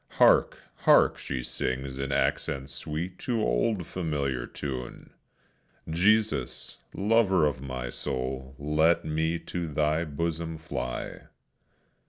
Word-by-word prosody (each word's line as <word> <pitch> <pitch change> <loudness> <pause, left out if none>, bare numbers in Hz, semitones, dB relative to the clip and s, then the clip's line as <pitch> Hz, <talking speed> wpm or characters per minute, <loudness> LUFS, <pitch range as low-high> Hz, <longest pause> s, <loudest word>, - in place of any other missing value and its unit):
Hark! - - +5 0.2
hark! - - +5
she 65 -2 -4
sings 65 +2 -3
in 70 0 -2
accents 70 0 0
sweet, 80 +6 -4
to 120 -3 -1
old 85 - +1
familiar 70 -9 -2
tune! 65 -4 -6 0.8
"Jesus, 95 - +1 0.2
lover 100 -5 +4
of 70 -3 -1
my 65 -3 -4
soul, 65 +1 -4
Let 75 +4 +2
me 80 +2 0
to 85 0 -4
Thy 75 +2 +1
bosom 80 +2 -3
fly," 60 -6 -3
etc. - - -11
75 Hz, 115 wpm, -28 LUFS, 65-85 Hz, 0.8 s, Hark